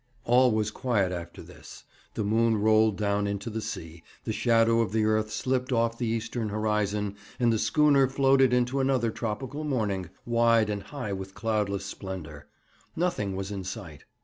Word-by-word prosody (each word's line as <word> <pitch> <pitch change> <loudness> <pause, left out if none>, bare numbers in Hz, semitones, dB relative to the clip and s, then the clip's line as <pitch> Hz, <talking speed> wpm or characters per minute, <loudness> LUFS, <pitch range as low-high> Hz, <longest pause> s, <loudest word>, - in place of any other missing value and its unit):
All 125 +2 +5
was 110 -1 0
quiet 105 -6 0
after 85 -1 -7
this. - - -13 0.3
The - - -1
moon 110 +2 +2
rolled 110 -1 +3
down 100 0 0
into 100 +2 -4
the 110 +1 -3
sea, 80 -4 -7 0.2
the 110 - -3
shadow 115 0 +3
of 105 -3 -2
the 110 -1 +2
earth 110 0 +1
slipped 125 +4 -1
off 115 -1 +1
the 120 - -1
eastern 115 0 -2
horizon, 105 -1 -1 0.2
and 120 -2 +3
the 110 - 0
schooner 145 -1 +4
floated 135 -1 +3
into 125 +2 +1
another 130 -4 +1
tropical 130 +7 -4
morning, 105 - -1 0.2
wide 115 -2 +3
and 100 -1 -3
high 125 -4 -5
with 95 0 -7
cloudless 105 -3 -1
splendour. 90 -7 -7 0.5
Nothing 160 - -1
was 95 +1 -4
in 100 -2 -4
sight. 90 -6 -8
110 Hz, 170 wpm, -27 LUFS, 100-120 Hz, 0.5 s, All